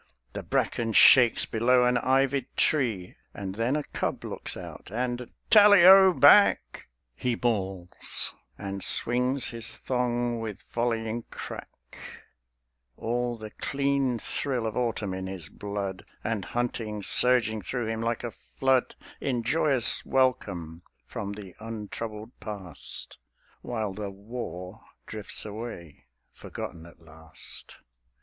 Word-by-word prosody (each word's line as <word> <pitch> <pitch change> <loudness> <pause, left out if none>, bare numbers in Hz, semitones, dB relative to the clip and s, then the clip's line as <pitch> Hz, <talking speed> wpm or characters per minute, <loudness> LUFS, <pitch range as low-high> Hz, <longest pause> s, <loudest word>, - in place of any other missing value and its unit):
The - - -4
bracken 115 -2 -1
shakes 120 -1 +7
below 125 +2 +3
an 125 0 +3
ivied 135 +1 +1
tree, 115 - +1 0.2
And 95 -2 -5
then 115 +6 0
a 150 - -1
cub - - -3
looks - - -2
out; - - -9
and 120 +1 -3 0.2
"Tally 205 -4 +8
o 190 0 +9
back!" 200 +3 +5 0.3
He 120 - -1
bawls, 95 -7 -1 0.2
and 100 -1 -5
swings 125 +2 +2
his 115 -1 -4
thong 120 -2 -1
with 110 -3 -6
volleying 115 -1 -1
crack, - - -10 1.0
All 120 +1 -2
the 110 -1 -8
clean 140 -2 0
thrill 125 +1 -1
of 110 -1 -3
autumn 115 -5 -1
in 95 0 -4
his 95 -4 -6
blood, 100 -2 -5 0.2
And 110 -4 -2
hunting 110 -1 -3
surging 115 -2 +2
through 125 +3 -3
him 110 0 -3
like 115 0 -1
a 120 - -3
flood 130 +1 0 0.2
In 125 -4 -1
joyous 135 -1 +2
welcome 90 -11 0 0.2
from 100 0 -5
the 100 -3 -10
untroubled 110 0 -6
past; 95 -7 -8 0.4
While 110 -5 -3
the 105 0 -5
war 100 -2 -7 0.2
drifts 105 -1 -3
away, 105 - -8 0.3
forgotten 85 0 -8
at 85 - -17
last. 80 0 -9
115 Hz, 125 wpm, -27 LUFS, 100-125 Hz, 1.0 s, o